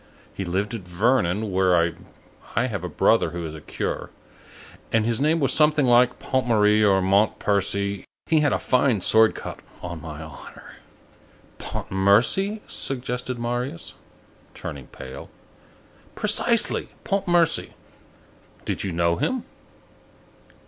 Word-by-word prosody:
He 95 Hz, -, -5 dB
lived 95 Hz, +5 st, -2 dB
at 115 Hz, -, -4 dB
Vernon, 100 Hz, +2 st, 0 dB
where 90 Hz, -3 st, +2 dB, 0.6 s
I 120 Hz, -, +2 dB
have 100 Hz, -8 st, -4 dB
a 90 Hz, -, -4 dB
brother -, -, +2 dB
who 85 Hz, -1 st, -5 dB
is 80 Hz, -, -6 dB
a 80 Hz, -, -9 dB
curé, -, -, -4 dB, 0.8 s
and 110 Hz, -1 st, +2 dB
his 115 Hz, +2 st, 0 dB
name 155 Hz, +3 st, +2 dB
was 135 Hz, -, +2 dB
something 150 Hz, -2 st, +4 dB
like 125 Hz, 0 st, +4 dB
Pontmarie 110 Hz, -5 st, +2 dB
or 95 Hz, -2 st, +3 dB
Montpercy. 100 Hz, 0 st, +1 dB, 0.2 s
He 160 Hz, -, +3 dB
had 145 Hz, -2 st, +2 dB
a -, -, +2 dB
fine 125 Hz, -5 st, +1 dB
sword 110 Hz, +4 st, +4 dB
cut, -, -, -7 dB, 0.2 s
on 85 Hz, -2 st, -6 dB
my 80 Hz, -1 st, -8 dB
honor." 80 Hz, -3 st, -12 dB, 0.8 s
"Pontmercy," 115 Hz, -, +1 dB
suggested 125 Hz, -1 st, -3 dB
Marius, 120 Hz, -4 st, -3 dB, 0.6 s
turning 70 Hz, -4 st, -7 dB
pale. 65 Hz, -, -10 dB, 0.9 s
"Precisely, -, -, +2 dB
Pontmercy. 175 Hz, -4 st, +1 dB, 0.9 s
Did -, -, -3 dB
you 95 Hz, -, -3 dB
know 85 Hz, 0 st, +1 dB
him?" 255 Hz, -, -1 dB
105 Hz, 120 wpm, -24 LUFS, 90-125 Hz, 0.9 s, something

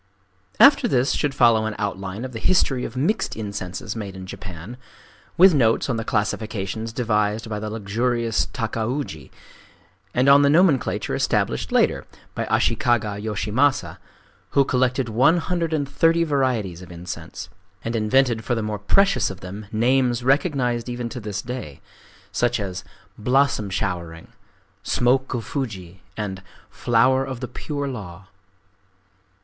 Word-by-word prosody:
After 280 Hz, -3 st, +7 dB
this 130 Hz, -, +2 dB
should 145 Hz, -2 st, -1 dB
follow 115 Hz, -3 st, +4 dB
an 110 Hz, -, -4 dB
outline 100 Hz, +2 st, -4 dB
of 130 Hz, -, -6 dB
the 115 Hz, -, -6 dB
history 135 Hz, -7 st, +2 dB
of 125 Hz, -, -7 dB
mixed 160 Hz, +12 st, 0 dB
incenses 100 Hz, -1 st, -5 dB
made 100 Hz, -4 st, -6 dB
in 95 Hz, 0 st, -8 dB
Japan,—with 105 Hz, -, -1 dB
notes 125 Hz, -1 st, +2 dB
on 120 Hz, -, -1 dB
the 115 Hz, -, -2 dB
classifications 110 Hz, 0 st, -2 dB
devised 110 Hz, -1 st, 0 dB
by 105 Hz, -1 st, -4 dB
the 105 Hz, 0 st, -4 dB
luxurious 115 Hz, +2 st, -1 dB
Takauji, 115 Hz, -, -3 dB, 0.8 s
and 125 Hz, +2 st, +1 dB
on 140 Hz, +1 st, +8 dB
the 140 Hz, -, +4 dB
nomenclature 155 Hz, -3 st, +2 dB
established -, -, 0 dB
later -, -, +2 dB, 0.3 s
by -, -, -3 dB
Ashikaga 105 Hz, -4 st, +1 dB
Yoshimasa, 110 Hz, +6 st, 0 dB, 0.6 s
who 140 Hz, -, +6 dB
collected 125 Hz, 0 st, +1 dB
one 130 Hz, +9 st, +4 dB
hundred 170 Hz, -1 st, -1 dB
and 145 Hz, -3 st, 0 dB
thirty 165 Hz, +4 st, +3 dB
varieties 125 Hz, -, 0 dB
of 90 Hz, -1 st, -11 dB
incense, 85 Hz, +1 st, -7 dB, 0.3 s
and 115 Hz, +1 st, -3 dB
invented 115 Hz, +1 st, +2 dB
for 120 Hz, -, -1 dB
the 115 Hz, -, -2 dB
more 105 Hz, -1 st, -3 dB
precious 195 Hz, -, +3 dB
of 95 Hz, 0 st, -9 dB
them 100 Hz, +3 st, -8 dB
names 120 Hz, +1 st, +2 dB
recognized 130 Hz, -4 st, +1 dB
even 120 Hz, -1 st, -4 dB
to 120 Hz, -, -6 dB
this 105 Hz, -2 st, -5 dB
day,—such 120 Hz, -, -5 dB
as 95 Hz, -2 st, -4 dB, 0.4 s
"Blossom 125 Hz, -2 st, +2 dB
Showering," 85 Hz, -4 st, -4 dB, 0.5 s
"Smoke 130 Hz, +2 st, +1 dB
of 115 Hz, -3 st, -4 dB
Fuji," 100 Hz, -8 st, -5 dB, 0.2 s
and 95 Hz, -3 st, -4 dB, 0.3 s
"Flower 130 Hz, +3 st, +2 dB
of 130 Hz, -2 st, -5 dB
the 125 Hz, -, -4 dB
Pure 145 Hz, +3 st, -4 dB
Law." 95 Hz, -6 st, -8 dB
115 Hz, 140 wpm, -23 LUFS, 105-130 Hz, 0.8 s, on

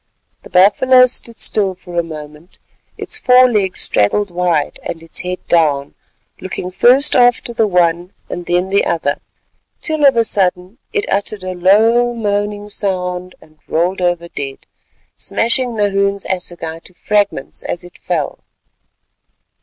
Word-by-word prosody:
The -, -, -14 dB
buffalo 255 Hz, +8 st, +5 dB
stood 240 Hz, -2 st, -1 dB
still 195 Hz, -3 st, +2 dB
for 175 Hz, -1 st, -5 dB
a -, -, 0 dB
moment, 155 Hz, +1 st, -11 dB, 0.4 s
its -, -, -2 dB
fore 255 Hz, 0 st, +6 dB
legs 205 Hz, -6 st, 0 dB
straddled 185 Hz, -, +1 dB
wide 175 Hz, -4 st, -1 dB
and 165 Hz, -1 st, -7 dB
its 165 Hz, -, -3 dB
head 180 Hz, 0 st, -5 dB
down, 145 Hz, -4 st, +1 dB, 0.5 s
looking 185 Hz, -1 st, -6 dB
first 255 Hz, +9 st, +4 dB
after 245 Hz, -1 st, +3 dB
the 225 Hz, -2 st, +1 dB
one 175 Hz, -1 st, +1 dB, 0.2 s
and 175 Hz, -, -7 dB
then 180 Hz, +2 st, 0 dB
the 200 Hz, -, +3 dB
other, 160 Hz, -4 st, -1 dB, 0.6 s
till 310 Hz, -2 st, -1 dB
of 270 Hz, -, +4 dB
a 230 Hz, -, +3 dB
sudden 185 Hz, +2 st, -1 dB
it 420 Hz, -1 st, -1 dB
uttered 200 Hz, 0 st, -2 dB
a 185 Hz, 0 st, -4 dB
low 225 Hz, +7 st, +3 dB
moaning 205 Hz, -1 st, -2 dB
sound 185 Hz, -3 st, -3 dB
and 155 Hz, -1 st, -21 dB
rolled 180 Hz, +4 st, 0 dB
over 175 Hz, -1 st, 0 dB
dead, 135 Hz, -4 st, -7 dB, 0.5 s
smashing 235 Hz, +1 st, 0 dB
Nahoon's 200 Hz, -1 st, 0 dB
assegai 170 Hz, -3 st, -5 dB
to 185 Hz, -, -16 dB
fragments 205 Hz, -10 st, -1 dB
as 175 Hz, -, -4 dB
it 175 Hz, -, -15 dB
fell. -, -, -3 dB
185 Hz, 145 wpm, -16 LUFS, 175-215 Hz, 0.6 s, fore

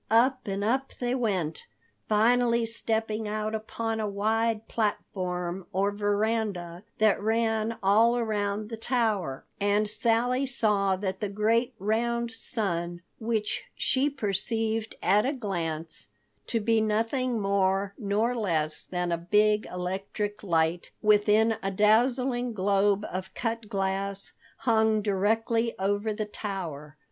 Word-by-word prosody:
Up 255 Hz, +3 st, +3 dB
and 195 Hz, 0 st, -2 dB
up 260 Hz, +5 st, 0 dB
they 245 Hz, 0 st, 0 dB
went, 190 Hz, -11 st, -1 dB, 0.4 s
finally 235 Hz, +2 st, +3 dB
stepping 220 Hz, -1 st, -1 dB
out 215 Hz, +1 st, -2 dB
upon 220 Hz, +1 st, -3 dB
a 215 Hz, -, -1 dB
wide 220 Hz, +2 st, 0 dB
platform 185 Hz, -4 st, -2 dB
or 195 Hz, +2 st, +1 dB
veranda 205 Hz, -4 st, -1 dB, 0.2 s
that 215 Hz, -2 st, +3 dB
ran 225 Hz, +1 st, 0 dB
all 225 Hz, +5 st, +5 dB
around 210 Hz, -2 st, -1 dB
the 225 Hz, -, -5 dB
tower, 220 Hz, -, 0 dB
and 205 Hz, +1 st, +2 dB
Sally 240 Hz, +5 st, +1 dB
saw 205 Hz, -6 st, +2 dB
that 190 Hz, 0 st, -3 dB
the 210 Hz, -, -2 dB
great 225 Hz, +4 st, +1 dB
round 235 Hz, +3 st, 0 dB
sun—which 210 Hz, 0 st, -2 dB
she 270 Hz, +2 st, +2 dB
perceived 225 Hz, -2 st, -1 dB
at 205 Hz, +2 st, +4 dB
a 275 Hz, -, 0 dB
glance 165 Hz, -, -3 dB, 0.4 s
to 230 Hz, -, 0 dB
be 225 Hz, +1 st, +2 dB
nothing 230 Hz, +3 st, 0 dB
more 195 Hz, 0 st, +1 dB
nor 215 Hz, +2 st, 0 dB
less 160 Hz, -9 st, 0 dB
than 180 Hz, -1 st, -2 dB
a 170 Hz, -, +1 dB
big 210 Hz, +4 st, +2 dB
electric 195 Hz, +3 st, -4 dB
light 170 Hz, -2 st, 0 dB
within 215 Hz, +1 st, +4 dB
a 195 Hz, -, -1 dB
dazzling 240 Hz, +4 st, +2 dB
globe 200 Hz, +1 st, +2 dB
of 185 Hz, +1 st, -5 dB
cut 230 Hz, -2 st, -3 dB
glass—hung 200 Hz, +3 st, 0 dB
directly 225 Hz, +3 st, +1 dB
over 205 Hz, +3 st, 0 dB
the 215 Hz, 0 st, -2 dB
tower. 170 Hz, -8 st, -6 dB
210 Hz, 120 wpm, -28 LUFS, 195-225 Hz, 0.4 s, all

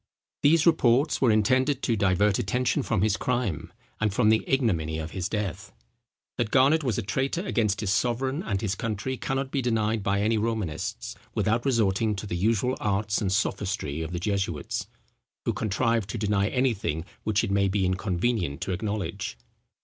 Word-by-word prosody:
These 155 Hz, +2 st, +4 dB
reports 140 Hz, -4 st, +3 dB
were 130 Hz, -, +4 dB
intended 130 Hz, +6 st, +2 dB
to 115 Hz, -, +2 dB
divert 100 Hz, 0 st, +2 dB
attention 125 Hz, +6 st, 0 dB
from 110 Hz, -6 st, 0 dB
his 110 Hz, -1 st, +2 dB
crime, 120 Hz, -, -2 dB, 0.3 s
and 110 Hz, -1 st, +1 dB
from 105 Hz, +2 st, +3 dB
the 110 Hz, 0 st, +3 dB
ignominy 85 Hz, -, +1 dB
of 80 Hz, 0 st, -5 dB
his 90 Hz, -2 st, -3 dB
death. 105 Hz, -6 st, -3 dB, 0.7 s
That 120 Hz, -3 st, +1 dB
Garnet 140 Hz, +6 st, +4 dB
was 125 Hz, -5 st, 0 dB
a 115 Hz, -, -1 dB
traitor 135 Hz, -, -1 dB
against 105 Hz, -, 0 dB
his 100 Hz, -2 st, +1 dB
sovereign 130 Hz, +6 st, 0 dB
and 100 Hz, -, -2 dB
his 105 Hz, -4 st, -1 dB
country, 110 Hz, +4 st, -3 dB
cannot 135 Hz, +1 st, -2 dB
be 140 Hz, -, 0 dB
denied 110 Hz, -2 st, 0 dB
by 100 Hz, 0 st, 0 dB
any 110 Hz, +1 st, +2 dB
Romanists, 105 Hz, -, -3 dB, 0.2 s
without 115 Hz, +3 st, +1 dB
resorting 110 Hz, -3 st, +2 dB
to 100 Hz, -, -6 dB
the 95 Hz, -, -3 dB
usual 115 Hz, +7 st, +1 dB
arts 100 Hz, +1 st, 0 dB
and 95 Hz, -3 st, 0 dB
sophistry 95 Hz, -6 st, -1 dB
of 80 Hz, +1 st, -4 dB
the 90 Hz, -, -3 dB
jesuits, 95 Hz, -6 st, -2 dB, 0.6 s
who -, -, +1 dB
contrive 115 Hz, 0 st, 0 dB
to -, -, -4 dB
deny 100 Hz, -1 st, +1 dB
anything 105 Hz, -, 0 dB, 0.2 s
which 110 Hz, -1 st, +1 dB
it -, -, -2 dB
may 100 Hz, 0 st, +3 dB
be 95 Hz, 0 st, +1 dB
inconvenient 90 Hz, -2 st, -1 dB
to 95 Hz, -, -2 dB
acknowledge. 100 Hz, -, -3 dB
105 Hz, 170 wpm, -26 LUFS, 95-120 Hz, 0.7 s, These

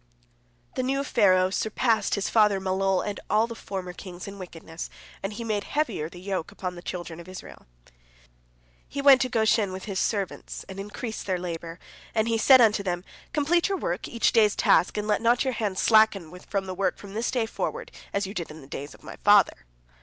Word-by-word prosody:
The -, -, -1 dB
new 270 Hz, +2 st, 0 dB
Pharaoh 185 Hz, -7 st, +3 dB
surpassed 220 Hz, +2 st, +1 dB
his 200 Hz, -, -1 dB
father 210 Hz, -3 st, +4 dB
Malol 190 Hz, 0 st, 0 dB
and 205 Hz, -, -4 dB
all 215 Hz, +2 st, +4 dB
the 230 Hz, -, -7 dB
former 190 Hz, -5 st, -6 dB
kings 180 Hz, 0 st, -9 dB
in 200 Hz, 0 st, -8 dB
wickedness, 165 Hz, -2 st, -8 dB, 0.3 s
and 195 Hz, -, -3 dB
he 235 Hz, -, -5 dB
made 215 Hz, -3 st, -1 dB
heavier 285 Hz, -, -1 dB
the 175 Hz, -, -12 dB
yoke 190 Hz, -1 st, -3 dB
upon 185 Hz, -3 st, -5 dB
the 175 Hz, -, -10 dB
children 175 Hz, -2 st, -6 dB
of 170 Hz, -, -11 dB
Israel. 185 Hz, -, -11 dB, 1.2 s
He -, -, -5 dB
went 275 Hz, -2 st, +7 dB
to 255 Hz, -, +1 dB
Goshen 220 Hz, -4 st, +2 dB
with 185 Hz, 0 st, -6 dB
his 195 Hz, -3 st, -3 dB
servants, 200 Hz, -4 st, -2 dB
and 190 Hz, 0 st, -8 dB
increased 210 Hz, +3 st, -6 dB
their 185 Hz, -2 st, +1 dB
labor, 170 Hz, -1 st, -5 dB, 0.4 s
and 220 Hz, 0 st, +2 dB
he 230 Hz, -1 st, +1 dB
said 260 Hz, +2 st, +7 dB
unto 215 Hz, -3 st, +4 dB
them, 180 Hz, -2 st, -2 dB, 0.3 s
"Complete 335 Hz, +5 st, +2 dB
your 390 Hz, -, 0 dB
work, 180 Hz, -, -3 dB
each 235 Hz, -, +1 dB
day's 215 Hz, -3 st, +4 dB
task, 185 Hz, -, +3 dB
and 210 Hz, 0 st, -2 dB
let 210 Hz, 0 st, +1 dB
not 235 Hz, +1 st, +3 dB
your 260 Hz, -2 st, -1 dB
hands 210 Hz, -5 st, -2 dB
slacken 215 Hz, -6 st, +4 dB
from 195 Hz, -2 st, -1 dB
the 185 Hz, -, -4 dB
work 190 Hz, +1 st, 0 dB
from 200 Hz, -1 st, -11 dB
this 225 Hz, +3 st, -1 dB
day 245 Hz, -3 st, 0 dB
forward, -, -, -4 dB, 0.2 s
as 200 Hz, 0 st, 0 dB
you 195 Hz, -, -6 dB
did 175 Hz, -6 st, -4 dB
in 155 Hz, +1 st, -10 dB
the 135 Hz, -, -13 dB
day 140 Hz, 0 st, -5 dB
of 145 Hz, -, -15 dB
my -, -, -9 dB
father." 205 Hz, -, +4 dB
200 Hz, 205 wpm, -26 LUFS, 185-225 Hz, 1.2 s, went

